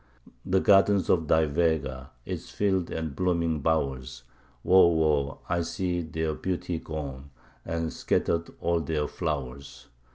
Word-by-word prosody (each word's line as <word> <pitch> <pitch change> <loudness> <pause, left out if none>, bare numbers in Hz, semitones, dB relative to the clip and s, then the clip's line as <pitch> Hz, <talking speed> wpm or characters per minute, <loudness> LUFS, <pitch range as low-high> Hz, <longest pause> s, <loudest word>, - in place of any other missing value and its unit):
The 95 0 +2
gardens 100 0 +4
of 80 -4 +2
thy 80 +1 +4
Vega, 70 -4 -1 0.2
its - - -5
fields 95 -4 0
and 80 -3 -4
blooming 85 -3 0
bowers 65 -5 -1 0.4
Woe, 95 -1 +7
woe! 75 -4 +1
I 85 0 0
see 90 +1 -2
their 80 -1 -2
beauty 90 0 -3
gone, 70 -4 -6 0.3
and 80 -1 -3
scattered 85 0 0
all 85 0 +1
their 75 -1 -1
flowers! 70 -5 -5
80 Hz, 130 wpm, -27 LUFS, 70-85 Hz, 0.4 s, Woe